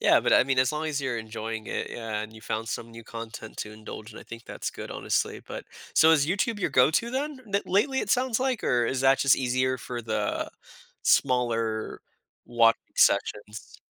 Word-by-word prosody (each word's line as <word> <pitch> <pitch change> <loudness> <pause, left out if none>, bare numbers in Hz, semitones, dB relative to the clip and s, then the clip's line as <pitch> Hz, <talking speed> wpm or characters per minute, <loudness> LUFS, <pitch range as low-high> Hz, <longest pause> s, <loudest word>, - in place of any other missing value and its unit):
Yeah, - - +5
but, - - +1
I - - +7
mean, 135 -1 0
as 130 +2 +3
long 155 +1 -2
as 150 -2 -1
you’re 130 -4 -2
enjoying 110 0 -6
it, - - -3
yeah, 110 -2 -4
and 110 - -8
you 110 - -12
found 110 +1 -3
some 115 +2 -4
new 115 0 -11
content 115 -1 -8
to 105 - -4
indulge 110 0 -9
in, - - -11
I - - -11
think 115 0 -10
that’s - - -5
good, - - -8
honestly. - - -1
But - - -8 0.3
so 160 0 +7
is 145 -3 +4
YouTube 205 +5 0
your 165 - 0
go-to 155 - +3
then? 285 +4 -2 0.2
N 200 - +4
lately, 265 +8 +2
it - - -3
sounds 250 -2 +2
like, 260 -4 0
or 120 -1 +2
is 130 - -1
that 135 0 +5
just 135 - +6
easier 130 0 0
for 120 -1 -6
the 110 -1 -2 0.5
smaller 115 -4 +1 0.5
wa 115 -1 +5 0.2
sessions? 105 +1 +1
125 Hz, 205 wpm, -27 LUFS, 115-150 Hz, 0.5 s, I